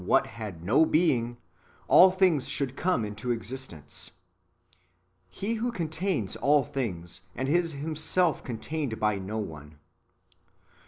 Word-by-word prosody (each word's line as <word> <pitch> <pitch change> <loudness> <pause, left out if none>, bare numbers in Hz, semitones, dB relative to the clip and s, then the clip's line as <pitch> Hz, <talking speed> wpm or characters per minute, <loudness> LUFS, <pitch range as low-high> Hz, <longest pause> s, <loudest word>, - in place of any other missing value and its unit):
what - - +3
had 105 -7 -8
no 120 - +4
being, 125 -8 +2 0.5
all 185 - +8
things 185 -7 +2
should 135 -2 -2
come 180 -11 +1
into 105 +4 -5
existence:" 115 - -4 1.2
He 200 - -3
who 235 +2 -1
contains 165 - -2
all 145 0 +4
things, 95 -13 -4
and 130 - -2
is 165 +2 +2
Himself 155 +4 0
contained 130 +1 -4
by 105 -2 +1
no 100 +3 -4
one. 75 -7 -7
130 Hz, 120 wpm, -28 LUFS, 105-160 Hz, 1.2 s, all